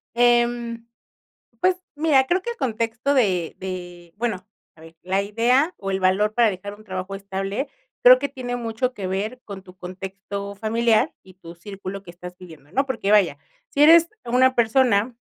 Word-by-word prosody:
Em, 240 -1 +2 0.8
pues 370 0 +3 0.2
mira, 290 -4 +3
creo 360 +6 +1
que 475 - -4
el 470 - -6
contexto 230 - -1
de 185 - +1
de, 175 -2 -7
bueno, 215 -6 -3 0.3
a - - -19
ver, 165 0 -14
la 190 +2 0
idea 245 - +2
o 195 - -4
el 190 0 -1
valor 195 +3 +2
para 235 -2 +4
dejar 200 +2 -7
un 215 +1 -17
trabajo 185 -1 -5
estable, 195 +5 -4 0.3
creo 255 +1 +9
que 280 +2 -2
tiene 250 -3 -5
mucho 235 +2 -2
que 195 -5 -5
ver 205 +7 -3
con 200 -2 -9
tu 180 -1 -16
contexto 195 +2 -7
familiar 225 +5 +1
y 185 - -17
tu 170 -2 -12
círculo 195 +1 -8
que 180 - -11
estás 180 +1 -10
viviendo, 160 -5 -14
¿no? 275 +7 +2
Porque 225 -6 -2
vaya, 195 -9 +4 0.3
si 285 - +2
eres 330 +2 +7 0.2
una 255 +2 +3
persona, 235 -1 +2
210 Hz, 175 wpm, -23 LUFS, 190-245 Hz, 0.8 s, creo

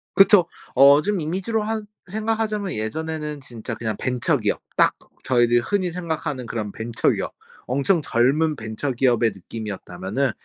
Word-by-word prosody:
그쵸. 195 -3 +7 0.3
어 140 +2 +8
좀 200 +2 0
이미지로 190 +8 -1
한 220 0 -2 0.2
생각하자면 215 -1 -1
예전에는 150 +7 -3
진짜 120 -4 -7
그냥 110 -3 -3
벤처기업 125 -2 0
딱 - - +4 0.3
저희들이 120 -2 +3
흔히 185 +7 0
생각하는 160 -7 -3
그런 110 -3 -4
벤처기업 115 +1 -1 0.3
엄청 140 +7 +1
젊은 145 +5 +2
벤처기업의 120 0 +1
느낌이었다면은 100 +4 -4
140 Hz, 340 characters per minute, -23 LUFS, 115-180 Hz, 0.3 s, 어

